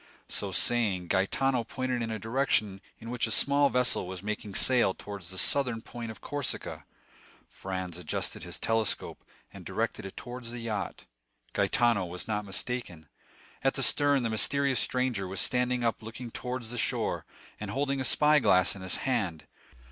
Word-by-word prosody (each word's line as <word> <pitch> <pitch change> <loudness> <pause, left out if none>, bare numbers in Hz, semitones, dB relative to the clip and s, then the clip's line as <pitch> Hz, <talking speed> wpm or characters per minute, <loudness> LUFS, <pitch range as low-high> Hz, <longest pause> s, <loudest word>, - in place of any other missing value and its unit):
So 100 - -1
saying, 95 -3 +2
Gaetano 125 +6 +1
pointed 130 +1 -2
in 115 - -2
a 110 - -2
direction 110 -3 0 0.2
in 115 +1 -8
which 120 -2 0
a - - -4
small 140 +4 +4
vessel 125 -7 +2
was 95 0 -6
making 105 -1 -4
sail 120 -7 +3
towards 100 -4 -8
the 95 - -8
southern 125 -1 +2
point 120 -1 -7
of 110 - -9
Corsica. 145 -4 -4 0.6
Franz 95 -2 -5
adjusted 85 - -3
his - - -3
telescope, 115 -1 0 0.3
and - - -10
directed - - -2
it 95 - -12
towards 120 -1 -7
the 120 - -5
yacht. 110 -3 -4 0.5
Gaetano 115 -5 +2
was 90 +3 -6
not 105 -1 -2
mistaken. 95 - -3 0.5
At - - +2
the - - +1
stern 145 -2 +4
the 115 - -1
mysterious 135 +3 +2
stranger 125 -7 0
was 95 +1 -3
standing 125 -1 +2
up 115 -1 0
looking 115 +2 -8
towards 125 -2 -5
the 120 - -2
shore, - - 0 0.4
and 105 - -5
holding 135 +3 -1
a - - 0
spy 150 +4 +5
glass 95 -8 +4
in 100 - -9
his 95 -1 0
hand. 100 -12 -1
115 Hz, 170 wpm, -29 LUFS, 100-125 Hz, 0.6 s, spy